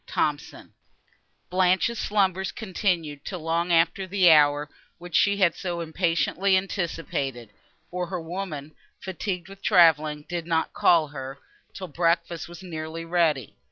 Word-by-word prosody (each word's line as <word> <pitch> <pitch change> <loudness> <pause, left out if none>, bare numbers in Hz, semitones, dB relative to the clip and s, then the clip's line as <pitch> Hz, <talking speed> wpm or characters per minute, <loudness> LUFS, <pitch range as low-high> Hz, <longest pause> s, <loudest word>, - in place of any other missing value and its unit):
THOMSON - - -3 0.8
Blanche's 185 +5 +2
slumbers 190 -2 0
continued, 175 -8 -2
till 180 -3 -6
long 165 +2 -1
after 170 +3 +2
the 185 -2 +5
hour, 145 -1 +4 0.3
which 175 -1 -8
she 200 0 +4
had 185 -4 +3
so 175 -2 -4
impatiently 170 +3 +1
anticipated, 145 - -3 0.4
for 180 0 -3
her 185 -1 -4
woman, 160 -4 -6 0.3
fatigued 190 -1 -4
with 195 0 -13
travelling, 155 -5 +4
did 170 -2 -4
not 165 -1 0
call 160 -4 +3
her, 135 -1 -7 0.4
till 185 - -6
breakfast 170 0 -1
was 175 +2 -11
nearly 165 -1 -6
ready. 165 - 0
170 Hz, 130 wpm, -25 LUFS, 155-185 Hz, 0.8 s, the